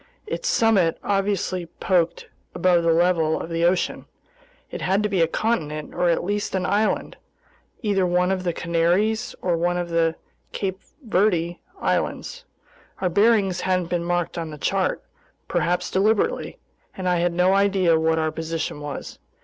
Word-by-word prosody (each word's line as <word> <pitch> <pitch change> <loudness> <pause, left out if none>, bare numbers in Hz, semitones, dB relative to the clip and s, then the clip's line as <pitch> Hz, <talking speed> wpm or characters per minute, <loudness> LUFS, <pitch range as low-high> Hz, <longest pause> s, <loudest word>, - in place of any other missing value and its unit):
Its 475 +3 -4
summit 205 - +3
obviously 195 -3 -1
poked 175 -3 +1 0.3
above 180 -1 +3
the 165 0 +2
level 165 -2 +2
of - - -6
the 165 0 0
ocean. 175 +1 +1 0.7
It - - -6
had 195 +3 +1
to 210 - 0
be 190 -3 +1
a 165 - +4
continent 155 -7 -2
or 175 - +1
at 170 - +1
least 205 +2 -2
an 185 -1 0
island, 215 +3 0 0.7
either 200 -3 +1
one 180 +1 +2
of 185 -1 -1
the 175 - 0
Canaries 175 +7 0
or 180 -2 +2
one 175 +1 0
of 175 -1 -3
the 165 -1 +1 0.4
Cape 190 -1 -3 0.3
Verde 180 -5 +1 0.2
Islands. - - -2 0.5
Our 185 - 0
bearings 200 -1 +3
hadn't 185 -2 0
been 175 -1 0
marked 175 0 -1
on 165 -1 -4
the 150 - -8
chart—perhaps 175 +4 -2
deliberately—and 205 - -1
I 180 -1 +2
had 170 0 +1
no 180 +2 +3
idea 195 -4 +3
what 160 0 +2
our 160 -1 0
position 160 -1 -4
was. 145 -1 -7
180 Hz, 155 wpm, -23 LUFS, 165-195 Hz, 0.7 s, a